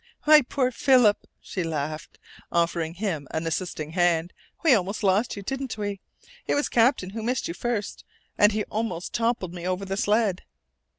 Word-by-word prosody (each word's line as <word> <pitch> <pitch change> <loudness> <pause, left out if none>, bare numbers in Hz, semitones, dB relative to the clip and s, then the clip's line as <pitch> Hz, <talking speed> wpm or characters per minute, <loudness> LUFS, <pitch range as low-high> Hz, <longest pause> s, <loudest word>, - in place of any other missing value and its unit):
"My 305 0 +8
poor 255 0 0
Philip!" 245 -4 +3
she 185 - -4
laughed, 155 -1 -4 0.3
offering 170 -1 0
him 175 -8 -3
an 160 +1 -3
assisting 160 -2 -3
hand. 175 -1 +1 0.3
"We 320 -5 +6
almost 200 0 0
lost 200 +4 +2
you, 200 - -7
didn't 270 +1 -4
we? 205 -2 -3 0.5
It - - +1
was 290 - 0
Captain 230 -5 +2
who 225 +2 -5
missed 245 +3 -1
you 170 - -4
first, 220 +2 -3 0.3
and 205 +1 +5
he 210 0 -1
almost 210 -6 -4
toppled 230 -6 -1
me 175 0 -5
over 185 +1 -2
the 195 0 -3
sled!" 210 -3 +1
200 Hz, 170 wpm, -25 LUFS, 175-230 Hz, 0.5 s, My